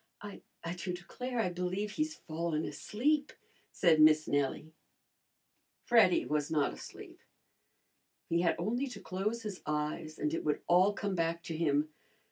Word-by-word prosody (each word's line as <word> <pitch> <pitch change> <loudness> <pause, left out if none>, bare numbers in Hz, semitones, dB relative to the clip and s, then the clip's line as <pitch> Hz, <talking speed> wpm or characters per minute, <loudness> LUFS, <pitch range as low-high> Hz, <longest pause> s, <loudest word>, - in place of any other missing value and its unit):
"I 205 -1 -9 0.4
do 180 0 -3
declare, 245 +8 -5
I 220 - +2
believe 180 +4 -2
he's 310 +5 -2
fallen 160 -1 -3
asleep," 290 +6 0 0.4
said 165 -4 +4
Miss 155 0 +6
Nellie. 145 +2 -1 1.1
Freddy 225 -7 +5
was 150 -1 -1
not 150 -3 +1
asleep. - - -11 1.1
He 170 +1 +1
had 170 -2 +2
only 240 +10 -1
to 245 - -8
close 210 +5 -3
his 205 -4 -6
eyes 150 +1 -2
and 150 +1 -1
it - - -2
would 150 -1 -1
all 185 +4 +5
come 200 -1 -2
back 170 -1 -1
to 165 - -5
him. 150 -2 +1
175 Hz, 145 wpm, -32 LUFS, 155-210 Hz, 1.1 s, Miss